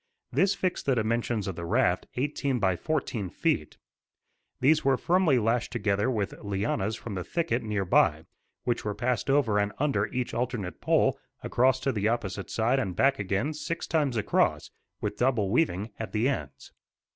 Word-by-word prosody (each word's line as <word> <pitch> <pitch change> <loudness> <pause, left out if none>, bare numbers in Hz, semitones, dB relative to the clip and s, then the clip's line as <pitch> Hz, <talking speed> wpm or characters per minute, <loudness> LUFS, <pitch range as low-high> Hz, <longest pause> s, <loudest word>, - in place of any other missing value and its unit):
This 195 +1 +3
fixed 185 -6 -2
the 135 - +3
dimensions 115 -2 0
of 95 - -3
the 85 - -6
raft, 90 +1 +1
eighteen 140 0 -1
by 95 -5 +2
fourteen 115 - -2
feet. - - -1 0.8
These 155 +4 +4
were 135 -1 +3
firmly 175 -5 +3
lashed 115 +1 0
together 105 -1 0
with 105 -6 -1
lianas 100 +1 -1
from 115 -1 -7
the 90 -2 -3
thicket 165 - -1
near 105 -3 -2
by, 80 -3 +3 0.4
which 120 -1 -1
were 105 -1 -2
passed 125 +4 -1
over 130 -7 +3
and 100 0 0
under 145 -1 +1
each 125 -1 -3
alternate 120 -7 -3
pole, - - +2 0.2
across 130 +1 +2
to 135 - +1
the 105 -3 0
opposite 105 -4 -2
side 120 +4 +1
and 95 -9 -2
back 135 +6 +3
again, 100 +9 -1
six 165 +3 -4
times 145 -7 0
across, 105 - +1 0.3
with 105 0 -3
double 120 -6 +1
weaving 110 - +1
at 110 - -5
the 110 +3 +2
ends. 75 - -4
115 Hz, 170 wpm, -28 LUFS, 100-135 Hz, 0.8 s, These